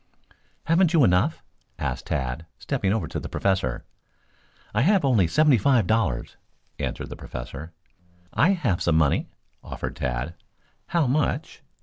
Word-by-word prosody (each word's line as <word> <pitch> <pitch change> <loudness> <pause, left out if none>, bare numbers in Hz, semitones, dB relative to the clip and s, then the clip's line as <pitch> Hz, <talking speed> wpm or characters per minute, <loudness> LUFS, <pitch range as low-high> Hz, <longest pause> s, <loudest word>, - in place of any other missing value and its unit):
"Haven't 170 +1 +3
you 160 -4 +5
enough?" 90 -4 +2 0.3
asked 65 0 -3
Tad, 65 +5 -2
stepping 95 - -1
over 110 +1 0
to - - -4
the - - -7
Professor. 95 -1 -1 0.9
"I - - +2
have 185 +2 +4
only 110 -10 +4
seventy 145 - +4
five 120 -1 +3
dollars," 100 - 0 0.4
answered - - -3
the - - -5
Professor. 70 +6 -8 0.6
"I 185 +6 +4
have 125 - 0
some 85 - +2
money," 75 -3 +2 0.3
offered - - -5
Tad. 65 +6 -2 0.5
"How 170 -3 +2
much?" 145 +4 -1
105 Hz, 135 wpm, -25 LUFS, -, 0.9 s, you